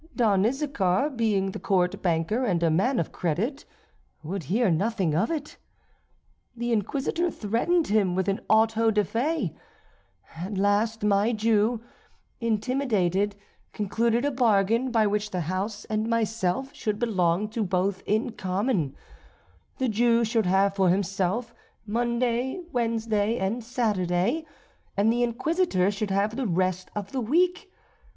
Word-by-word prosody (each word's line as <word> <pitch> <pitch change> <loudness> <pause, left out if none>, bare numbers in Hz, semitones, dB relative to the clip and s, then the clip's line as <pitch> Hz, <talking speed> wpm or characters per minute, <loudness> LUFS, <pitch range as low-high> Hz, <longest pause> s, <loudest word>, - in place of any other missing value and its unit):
Don 210 -4 +3
Issachar, 270 -3 0
being 210 -6 0
the - - -6
court 185 0 0
banker, 175 +7 0
and 180 -8 0
a 165 - +3
man 205 +11 +2
of 165 - -1
credit, 210 - -2 0.6
would 170 +1 -4
hear 210 - +2
nothing 190 -1 0
of 180 +9 +1
it. 300 -3 -4 1.0
The 240 +1 -2
Inquisitor 280 - 0
threatened 270 - 0
him 200 -4 +1
with 190 +1 0
an 200 +2 0
auto 225 +1 +4
da 210 -1 +2
fé. 245 - -1 0.8
At 190 +4 -4
last 205 +3 +1
my 210 +3 +3
Jew, 220 +1 +2 0.6
intimidated, 210 -4 0 0.4
concluded 230 +4 0
a 290 - +1
bargain, 230 -1 +2
by 225 -3 +3
which 210 0 0
the 185 -3 -2
house 190 +6 -3
and 215 +1 -2
myself 230 +2 -1
should 215 -8 -2
belong 195 -4 +1
to 220 0 -2
both 190 0 0
in 220 +4 +1
common; 190 - -1 0.8
the 260 - 0
Jew 235 +1 +3
should 225 -3 +1
have 195 +2 +3
for 190 -2 +3
himself 195 +5 0 0.3
Monday, 240 - 0
Wednesday, 225 -2 0
and 220 +5 -2
Saturday, 220 - 0 0.5
and 215 +3 +3
the 240 - 0
Inquisitor 240 - +1
should 205 0 -3
have 200 +3 0
the 260 -2 -1
rest 185 0 0
of 205 -2 -5
the 265 - -2
week. 360 - +1
215 Hz, 140 wpm, -26 LUFS, 190-240 Hz, 1.0 s, auto